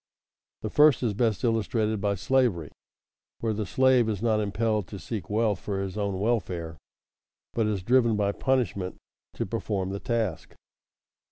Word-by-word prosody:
_ -, -, -66 dB
The 110 Hz, -, -3 dB
first 150 Hz, -4 st, +5 dB
is 115 Hz, -4 st, +1 dB
best 110 Hz, -1 st, 0 dB
illustrated 110 Hz, -2 st, 0 dB
by 100 Hz, 0 st, +1 dB
slavery, 105 Hz, -, +1 dB, 0.7 s
where 115 Hz, -1 st, -1 dB
the 105 Hz, -1 st, -3 dB
slave 130 Hz, 0 st, +4 dB
is 105 Hz, -3 st, -2 dB
not 110 Hz, -1 st, +2 dB
impelled 105 Hz, -1 st, 0 dB
to 100 Hz, -, -8 dB
seek 105 Hz, +1 st, -6 dB
wealth 110 Hz, -1 st, +1 dB
for 100 Hz, -2 st, -3 dB
his 95 Hz, -1 st, -4 dB
own 100 Hz, -3 st, -2 dB
welfare, 90 Hz, -8 st, -1 dB, 0.7 s
but 115 Hz, -2 st, +1 dB
is 100 Hz, -4 st, -2 dB
driven 115 Hz, 0 st, +3 dB
by 100 Hz, -1 st, +1 dB
punishment 110 Hz, -7 st, -1 dB, 0.4 s
to -, -, -2 dB
perform 95 Hz, -2 st, -2 dB
the 100 Hz, -, -4 dB
task. 110 Hz, -8 st, -2 dB
105 Hz, 160 wpm, -27 LUFS, 100-115 Hz, 0.7 s, first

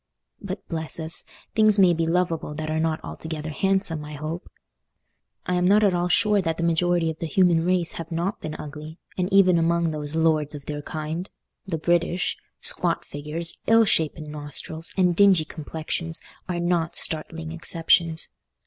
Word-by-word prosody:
But 195 Hz, -2 st, -6 dB
bless 160 Hz, -1 st, -4 dB
us, 160 Hz, 0 st, -2 dB, 0.3 s
things 215 Hz, -1 st, +5 dB
may 185 Hz, -3 st, +6 dB
be 165 Hz, 0 st, 0 dB
lovable 165 Hz, -3 st, 0 dB
that 155 Hz, 0 st, -4 dB
are 160 Hz, -, 0 dB
not 160 Hz, 0 st, 0 dB
altogether 160 Hz, -1 st, -6 dB
handsome, 190 Hz, -2 st, 0 dB
I 150 Hz, 0 st, -8 dB
hope? 155 Hz, +4 st, -5 dB, 1.0 s
I 180 Hz, -, -1 dB
am 180 Hz, 0 st, +2 dB
not 205 Hz, +3 st, +5 dB
at 200 Hz, -3 st, +4 dB
all 175 Hz, 0 st, +1 dB
sure 210 Hz, +2 st, +3 dB
that 165 Hz, -2 st, -2 dB
the 170 Hz, -, -2 dB
majority 170 Hz, 0 st, +2 dB
of 160 Hz, -, -11 dB
the 165 Hz, -, -3 dB
human 170 Hz, 0 st, +3 dB
race 180 Hz, -1 st, +1 dB
have 165 Hz, 0 st, -7 dB
not 170 Hz, +4 st, -2 dB
been 155 Hz, 0 st, -5 dB
ugly, 150 Hz, +2 st, -8 dB, 0.2 s
and 180 Hz, 0 st, -1 dB
even 185 Hz, -3 st, +5 dB
among 170 Hz, 0 st, +1 dB
those 150 Hz, 0 st, -3 dB
"lords 155 Hz, -2 st, +1 dB
of 145 Hz, -, -9 dB
their 150 Hz, -1 st, -4 dB
kind," 155 Hz, +5 st, -5 dB, 0.4 s
the 170 Hz, -4 st, -2 dB
British, 175 Hz, +2 st, +1 dB, 0.3 s
squat -, -, +1 dB
figures, 150 Hz, +3 st, 0 dB
ill 225 Hz, 0 st, +6 dB
shapen 155 Hz, -4 st, 0 dB
nostrils, 150 Hz, +2 st, -4 dB
and 180 Hz, -2 st, +3 dB
dingy 190 Hz, -4 st, +5 dB
complexions 160 Hz, +1 st, -4 dB, 0.3 s
are 175 Hz, -1 st, -1 dB
not 175 Hz, -1 st, 0 dB
startling 160 Hz, 0 st, -4 dB
exceptions. 165 Hz, 0 st, +2 dB
165 Hz, 170 wpm, -24 LUFS, 155-180 Hz, 1.0 s, may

